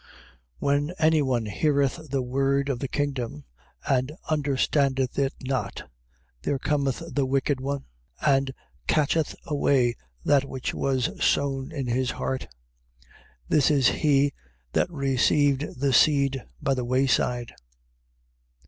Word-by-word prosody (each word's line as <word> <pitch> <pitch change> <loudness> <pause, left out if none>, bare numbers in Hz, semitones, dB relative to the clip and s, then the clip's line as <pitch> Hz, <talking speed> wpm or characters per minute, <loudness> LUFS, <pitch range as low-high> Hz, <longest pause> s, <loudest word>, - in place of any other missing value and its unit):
13:19. - - -25 0.5
When 145 - +1
any 155 -1 +4
one 125 -5 0
heareth 140 +6 0
the 135 -1 0
word 135 +2 +1
of 130 -3 -1
the 135 - -2
kingdom, 130 - -3 0.4
and 135 -1 +1 0.2
understandeth 140 -2 +1
it 135 -1 +1
not, 130 -1 -3 0.5
there 140 - 0
cometh 140 +1 -1
the 140 -2 +1
wicked 135 +1 +1
one, 140 +1 -3 0.3
and 135 -1 +2 0.4
catcheth 155 +1 +1
away 140 -5 +2 0.3
that 140 -2 +4
which 130 -2 -4
was 130 -3 -1
sown 135 0 +1
in 140 -4 -3
his 125 +1 0
heart: 130 0 -3 1.0
this 150 -2 +3
is 140 -4 +4
he 145 -2 +2 0.4
that - - +1
received 140 -1 +1
the 140 -1 +1
seed 140 -2 +3
by 140 -2 +1
the 130 -2 -2
way 130 +3 +2
side. 125 -2 0
135 Hz, 130 wpm, -26 LUFS, 130-145 Hz, 1.0 s, any